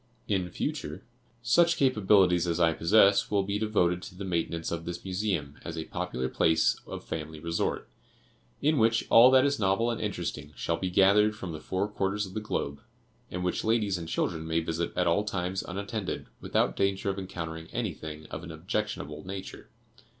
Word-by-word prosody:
In 95 -4 0
future, 80 +1 -4 0.4
such 170 +8 +4
capabilities 95 -9 +4
as 85 0 0
I 85 -1 +4
possess 100 +4 +4
will 100 -2 +2
be 100 +1 -2
devoted 90 -5 +1
to 90 - -10
the 100 +2 -6
maintenance 85 -2 -2
of 85 0 -3
this 85 +1 -6
Museum 90 -7 -2
as 85 -1 -6
a 80 - -3
popular 90 -8 -3
place 80 +4 +3
of - - -7
family 80 -1 -5
resort, 85 +1 -2 0.8
in 150 0 +3
which 115 0 +3
all 120 +2 +9
that 130 +1 +6
is 140 -1 +1
novel 100 +4 +2
and 115 - -4
interesting 85 -7 -4
shall 85 - -1
be 95 +2 -2
gathered 100 +3 +4
from 95 -5 -6
the 80 - -6
four 95 +5 -2
quarters 105 0 -1
of 95 - -10
the 110 - -2
globe, 70 -9 -3 0.5
and 90 0 -4
which 90 - -1
ladies 110 -4 +1
and 80 -1 -6
children 80 -2 -1
may 80 0 +1
visit 85 +1 -2
at 90 - +2
all 85 +5 +3
times 95 -2 -2
unattended, 100 +2 -4
without - - 0
danger 100 0 0
of 95 - -5
encountering 80 -3 -6
anything 80 -9 -5
of 80 - -5
an 85 - -8
objectionable 80 - -3
nature. 95 0 -8
95 Hz, 180 wpm, -29 LUFS, 85-105 Hz, 0.8 s, all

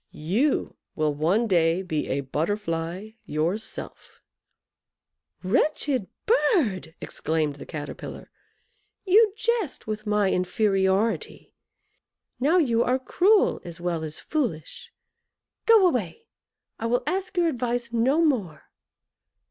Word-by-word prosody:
You 275 +7 +1 0.2
will 155 -1 +1
one 170 +11 +1
day 170 -2 +2
be 155 -5 -2
a 140 +2 -1
Butterfly 165 +5 -3
yourself." 175 +9 -4 1.2
"Wretched 255 +2 +1 0.2
bird!" 250 - +1
exclaimed 155 -2 -2
the - - -10
Caterpillar, 150 -3 -7 0.7
"you 420 +3 +5
jest 450 - -1
with 215 0 -5
my 210 -2 +2
inferiority 195 +3 0 0.9
now 300 +8 +3
you 240 -9 +3
are 250 +1 +1
cruel 380 +10 +2
as 170 -1 -8
well 170 -2 -2
as 155 -1 -6
foolish. 295 - -4 0.8
Go 450 -4 +7
away! 215 - -2 0.5
I 230 - -2
will 245 +2 +1
ask 375 +4 -3
your 345 -1 +3
advice 245 -4 -2
no 265 +8 +3
more." 210 - -2
215 Hz, 110 wpm, -25 LUFS, -, 1.2 s, Go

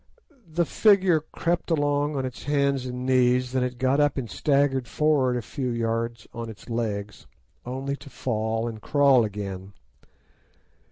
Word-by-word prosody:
The 165 +2 0
figure 190 -4 +4
crept 170 +3 -2
along 145 -1 +1
on 135 -1 -1
its 130 -1 -7
hands 140 -2 +1
and 125 0 -5
knees, 125 -1 +3
then 130 0 0
it 125 -1 -3
got 130 +3 +2
up 145 -1 +2
and 130 -3 -2
staggered 140 -1 +1
forward 140 -5 +2
a 120 - -4
few 130 +3 -4
yards 115 -1 -2
on 115 -1 -5
its 110 +2 -11
legs, 105 -3 -3 0.4
only 135 +2 -3
to 145 - -13
fall 110 -2 -2
and 110 -2 -6
crawl 140 -3 +4
again. 100 -2 -5
130 Hz, 155 wpm, -25 LUFS, 115-145 Hz, 0.4 s, figure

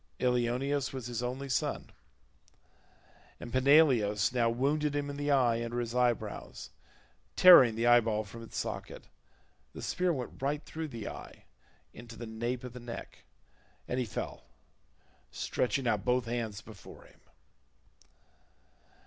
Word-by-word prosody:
Ilioneus 125 +3 0
was 130 -3 -6
his 120 -1 -4
only 130 +3 -4
son, 130 - -2 1.5
and 120 - -9
Peneleos 130 -6 +4
now 120 -2 +2
wounded 145 +5 0
him 145 0 -2
in - - -7
the 145 +1 -3
eye 120 -4 +3
under 120 +1 -3
his 120 -1 -3
eyebrows, 125 -2 -2 0.6
tearing 135 -11 +8
the 115 +1 -1
eye 120 0 +7
ball 110 -2 -1
from 110 +3 -11
its 115 - -9
socket: - - -5 0.7
the - - -8
spear 180 0 0
went 130 -6 -5
right 145 +3 -1
through 160 0 -5
the 115 -7 -7
eye - - -10 0.5
into 120 -1 -11
the 120 - -7
nape 120 +3 -4
of 125 -2 -8
the 125 - -8
neck, 120 -1 -9 0.6
and 125 - -2
he 125 - 0
fell, 95 - -6 0.8
stretching 130 +1 -1
out - - +1
both 125 0 +1
hands 115 -3 -3
before 110 -4 -13
him. - - -21
125 Hz, 140 wpm, -31 LUFS, 115-135 Hz, 1.5 s, tearing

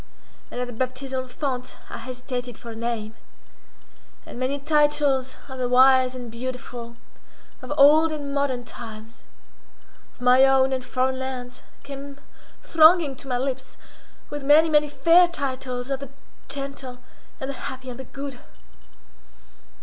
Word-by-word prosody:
And - - -6
at 250 - -1
the 245 - -8
baptismal 260 +2 -3
font 255 -1 -4
I - - -7
hesitated 250 -2 -6
for 235 - -9
a - - -8
name. 225 -2 -3 1.1
And - - -9
many 260 +2 0
titles 290 -3 +2
of 265 -1 -8
the 250 -1 0
wise 260 0 +5
and 245 -2 -7
beautiful, 240 -1 -6 0.7
of 255 - -8
old 310 +3 +7
and 285 -2 -4
modern 275 -3 0
times, 225 -1 -10 0.9
of - - -29
my 250 +1 +6
own 265 0 +4
and 260 -1 -2
foreign 260 +1 -1
lands, 255 -1 -6 0.2
came 280 0 -8 0.5
thronging 320 -3 +5
to 275 - -11
my 250 -2 0
lips, 265 0 -4 0.5
with 290 -1 -5
many, 305 +3 +6
many 300 -1 +3
fair 340 +4 +5
titles 260 -5 -4
of 270 - -1
the 275 -2 -8 0.4
gentle, 275 -2 -6 0.4
and 265 +1 -3
the 275 - -5
happy, 260 -1 -8
and 245 - -10
the 265 - -7
good. 275 -1 -7
260 Hz, 145 wpm, -24 LUFS, 250-280 Hz, 1.1 s, old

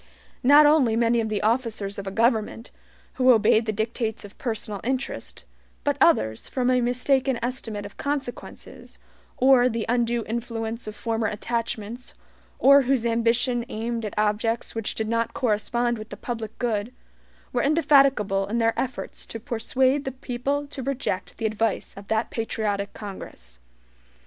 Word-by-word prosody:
Not 290 +4 +7
only 290 -7 +4
many 230 0 +3
of 220 - -2
the 210 -1 -2
officers 220 -3 0
of 195 -1 -6
government, 230 0 +1 0.5
who 255 0 +7
obeyed 220 0 +4
the - - +2
dictates 220 +1 -3
of 205 - -13
personal 220 -4 -3
interest, 250 - -3 0.4
but - - +1
others, 110 0 +3
from 255 -1 0
a 250 -1 +3
mistaken 255 +1 +1
estimate 225 -4 -4
of 205 - -11
consequences, 280 -3 -5 0.4
or 255 -1 +5
the 230 -2 -2
undue 240 -1 +1
influence 230 0 -4
of 215 - -6
former 225 -1 -1
attachments, 230 +2 -4 0.4
or 280 +1 +7
whose 260 -2 +1
ambition 235 +1 +1
aimed 230 +1 -3
at 210 - -5
objects 215 +2 0
which 225 -2 -2
did 220 - -2
not 230 +1 -1
correspond 240 -1 0
with 215 - -9
the - - -8
public 225 -3 -5
good, 230 -2 -1 0.6
were 245 - +1
indefatigable 275 -10 +3
in 220 +3 -2
their 230 -1 +2
efforts 255 -2 -4
to 225 - -6
persuade 260 +3 +1
the 265 - -3
people 265 +3 -3
to 280 -1 -7
reject 255 -7 -3
the 225 - -3
advice 220 -1 -1
of 200 0 -11
that 220 +1 0
patriotic 210 -3 -2
Congress. 60 - -9
230 Hz, 150 wpm, -25 LUFS, 215-250 Hz, 0.6 s, Not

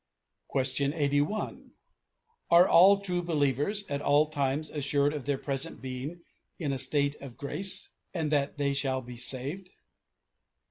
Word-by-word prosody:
Question 140 +1 0
81: 145 +6 -1 0.8
"Are 170 +2 +7
all 195 +3 +6
true 180 -3 -2
believers 155 - 0
at 140 0 -3
all 145 +1 +4
times 145 +1 -1
assured 145 0 +1
of 145 -4 -6
their 140 -1 0
present 140 +4 -4
being 135 +6 -6 0.3
in 145 -5 -2
a 135 - -3
state 140 0 +3
of 135 -4 -10
grace, 190 +7 0 0.2
and 160 -4 -2
that 145 -1 0
they 140 -1 0
shall 135 -2 0
be 120 0 -9
saved? 140 +10 -1
145 Hz, 140 wpm, -29 LUFS, 140-170 Hz, 0.8 s, Are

